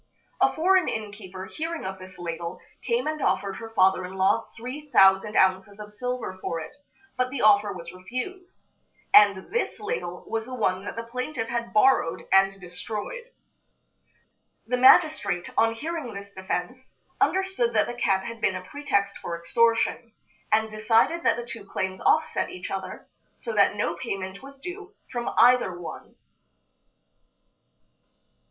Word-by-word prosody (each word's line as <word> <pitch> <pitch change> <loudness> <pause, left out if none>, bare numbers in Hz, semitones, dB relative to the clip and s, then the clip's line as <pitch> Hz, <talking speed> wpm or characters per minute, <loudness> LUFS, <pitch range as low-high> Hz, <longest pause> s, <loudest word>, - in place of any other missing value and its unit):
A - - +4
foreign 370 +3 +3
inn 215 -2 -4
keeper, 190 -2 -9
hearing 325 - -5
of 190 0 -5
this 185 0 -12
ladle, 170 -1 -5 0.2
came 470 +1 0
and 310 -1 -2
offered 195 -6 0
her 225 - -8
father 190 -3 +3
in 185 +1 -7
law 190 0 +2
three 265 +6 -7
thousand 195 -1 +5
ounces 190 +2 +2
of 210 0 -9
silver 245 -3 -4
for 165 - -3
it, 160 - -9 0.4
but 255 0 +1
the 260 -2 -3
offer 205 -1 +5
was 170 -1 -8
refused. 255 - -7 0.5
And 200 - +6
this 470 - -1
ladle 415 - -4
was 225 0 -3
the 255 - -6
one 190 -4 0
that - - -5
the 230 - -4
plaintiff 250 +1 -4
had 235 0 -3
borrowed 215 -6 +3
and 195 0 +4
destroyed. 210 - -6 1.4
The 250 - 0
magistrate, 260 - +4
on 225 0 +3
hearing 305 -3 -5
this 200 0 -9
defense, 190 +7 -4 0.3
understood 380 -11 +1
that 215 - +3
the 240 - -5
cat 195 -5 +1
had 230 -1 -7
been 190 - +2
a 185 - -5
pretext 200 -5 -1
for 170 - -4
extortion, 230 +5 +1 0.4
and 220 0 +3
decided 225 +10 +2
that - - +3
the 240 - -5
two 230 -3 -7
claims 190 -1 -4
offset 315 0 +2
each 180 - -7
other, 190 -1 -6 0.3
so 230 - -5
that 205 -1 +4
no 170 -4 0
payment 190 +2 -5
was 275 +1 -12
due 390 +6 -8 0.2
from 240 -1 -3
either 245 -8 +5
one. 175 - -9
220 Hz, 155 wpm, -26 LUFS, 190-255 Hz, 1.4 s, And